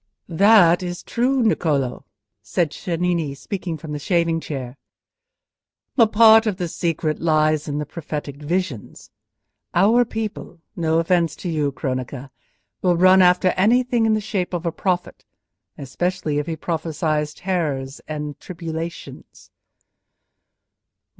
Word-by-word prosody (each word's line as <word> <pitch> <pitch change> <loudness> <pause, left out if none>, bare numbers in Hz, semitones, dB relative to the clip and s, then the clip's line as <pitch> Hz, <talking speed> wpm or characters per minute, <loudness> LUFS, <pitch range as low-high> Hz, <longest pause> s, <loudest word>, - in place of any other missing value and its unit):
"That 180 -1 +5
is 175 -1 -5
true, 255 +2 +1
Niccolò," 145 - 0 0.4
said 170 -5 -1
Cennini, 170 -5 -2
speaking 170 +3 -5
from 155 0 -9
the 150 - -4
shaving 165 +1 +1
chair, 130 -5 -6 1.2
"but 230 -4 +5
part 225 0 +7
of 205 -4 -1
the 180 -2 -2
secret 160 -2 -2
lies 155 -2 +2
in 145 -1 -3
the 150 - -2
prophetic 150 -2 -6
visions. 150 - -4 0.6
Our 215 +7 +5
people—no 175 -7 -4
offence 165 -1 +1
to - - -1
you, 150 -3 0
Cronaca—will 135 +6 -4
run 185 +2 +6
after 180 0 +4
anything 235 +5 +2
in 220 - +3
the 215 - -1
shape 195 -4 -2
of 175 0 -4
a 170 - 0
prophet, 180 +1 -2 0.5
especially 155 +2 -2
if 150 - -4
he 165 - -2
prophesies 155 -2 -2
terrors 145 -8 -3
and 150 -2 -5
tribulations." 165 -1 -8
170 Hz, 120 wpm, -21 LUFS, 150-185 Hz, 1.2 s, part